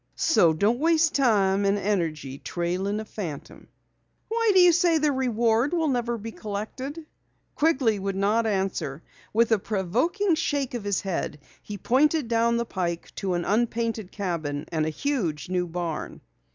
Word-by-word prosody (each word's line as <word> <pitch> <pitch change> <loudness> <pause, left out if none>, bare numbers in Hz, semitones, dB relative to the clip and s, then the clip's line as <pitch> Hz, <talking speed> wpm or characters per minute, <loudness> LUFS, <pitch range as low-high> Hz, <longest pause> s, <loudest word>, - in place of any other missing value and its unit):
So 175 - +4
don't 205 +10 +1
waste 325 0 +3
time 205 -7 +3
and 200 +1 +2
energy 160 -9 -2
trailing 185 +4 -2
a 220 - -5
phantom." 175 -10 -7 0.6
"Why 460 0 +1
do 380 - +5
you 360 -1 +8
say 340 -1 +3
the 305 -1 +2
reward 240 +1 +1
never 250 -8 0
will - - -2
be 225 +2 -6
collected?" 240 +10 -6 0.5
Quigley 270 -9 +2
would 195 0 -3
not 210 +4 +1
answer. 190 -7 -2 0.3
With 230 +1 +2
a 220 - +4
provoking 245 - 0
shake 285 -5 -1
of 240 -4 -4
his 200 -2 0
head, 185 -5 -3 0.2
he 210 - -7
pointed 285 - +2
down 235 0 +2
the 235 - -1
pike 175 -5 -4
to 190 -2 -1
an 175 - -2
unpainted 225 -2 -1
cabin 160 -7 -3
and 155 -2 0
a - - +1
huge 170 - -2
new 180 -1 0
barn. 170 -2 -4
215 Hz, 160 wpm, -25 LUFS, 185-265 Hz, 0.6 s, you